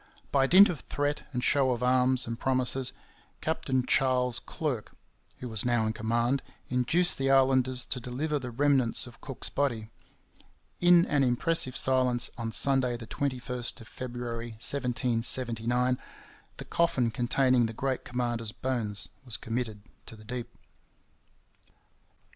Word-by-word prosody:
By 135 Hz, -1 st, +3 dB
dint 195 Hz, +6 st, +8 dB
of 165 Hz, -, -4 dB
threat 145 Hz, +1 st, -2 dB
and 125 Hz, -2 st, -3 dB
show 140 Hz, -2 st, +3 dB
of 120 Hz, 0 st, -4 dB
arms 125 Hz, 0 st, +2 dB
and 115 Hz, 0 st, -5 dB
promises, 130 Hz, 0 st, +1 dB, 0.5 s
Captain 130 Hz, -5 st, -1 dB
Charles 125 Hz, -2 st, +2 dB
Clerke, 135 Hz, -9 st, -4 dB, 0.4 s
who 125 Hz, -, -7 dB
was 110 Hz, -4 st, -2 dB
now 120 Hz, -2 st, +1 dB
in 110 Hz, -, -1 dB
command, 120 Hz, +4 st, 0 dB, 0.3 s
induced 130 Hz, +9 st, +2 dB
the 135 Hz, 0 st, 0 dB
islanders 130 Hz, -2 st, +3 dB
to 130 Hz, -, -3 dB
deliver 140 Hz, +5 st, -3 dB
the 130 Hz, -2 st, -6 dB
remnants 135 Hz, -1 st, +2 dB
of 120 Hz, -, -14 dB
Cook's 135 Hz, -4 st, -4 dB
body. 115 Hz, -6 st, -2 dB, 0.9 s
In 175 Hz, 0 st, +6 dB
an 145 Hz, -2 st, +1 dB
impressive 130 Hz, +2 st, +3 dB
silence, 130 Hz, -2 st, +2 dB
on 115 Hz, -2 st, -4 dB
Sunday 130 Hz, -1 st, +1 dB
the 115 Hz, -, -8 dB
21st 125 Hz, -1 st, -3 dB
of 110 Hz, -, -13 dB
February 120 Hz, -1 st, -6 dB
1779, 125 Hz, 0 st, 0 dB, 0.6 s
the -, -, -7 dB
coffin 135 Hz, -9 st, +1 dB
containing 120 Hz, +1 st, +2 dB
the -, -, -5 dB
great 130 Hz, +3 st, -3 dB
commander's 120 Hz, -3 st, -2 dB
bones 115 Hz, -5 st, -1 dB, 0.2 s
was 120 Hz, -4 st, 0 dB
committed 115 Hz, -3 st, -4 dB, 0.2 s
to -, -, -9 dB
the 110 Hz, 0 st, -15 dB
deep. 120 Hz, +1 st, -5 dB
125 Hz, 135 wpm, -28 LUFS, 120-135 Hz, 0.9 s, dint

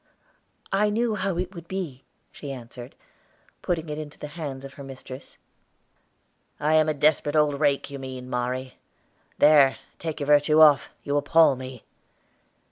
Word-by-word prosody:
"I 210 Hz, +2 st, +2 dB
knew 225 Hz, +2 st, 0 dB
how 190 Hz, -3 st, -2 dB
it 180 Hz, +2 st, -3 dB
would 170 Hz, -2 st, -10 dB
be," 170 Hz, -9 st, -5 dB, 0.3 s
she 145 Hz, -, -8 dB
answered, 125 Hz, -1 st, -10 dB, 0.7 s
putting 170 Hz, -2 st, -2 dB
it 150 Hz, 0 st, -5 dB
into 150 Hz, -1 st, -8 dB
the 150 Hz, -, -7 dB
hands 140 Hz, -5 st, -6 dB
of 135 Hz, -, -10 dB
her 140 Hz, -, -10 dB
mistress. 135 Hz, 0 st, -11 dB, 1.2 s
"I 150 Hz, +1 st, +1 dB
am 155 Hz, 0 st, +4 dB
a -, -, +1 dB
desperate 150 Hz, 0 st, +2 dB
old 150 Hz, -2 st, +2 dB
rake, 145 Hz, -2 st, +1 dB
you 140 Hz, -, -6 dB
mean, 130 Hz, -1 st, -7 dB
Mari. 125 Hz, +1 st, -3 dB, 0.6 s
There, 145 Hz, -3 st, +6 dB, 0.2 s
take 160 Hz, -2 st, -4 dB
your 145 Hz, -, -2 dB
virtue 150 Hz, +1 st, +4 dB
off, 150 Hz, -4 st, +6 dB
you 145 Hz, 0 st, 0 dB
appall 145 Hz, 0 st, +4 dB
me." 130 Hz, -2 st, -9 dB
145 Hz, 155 wpm, -25 LUFS, 135-160 Hz, 1.2 s, There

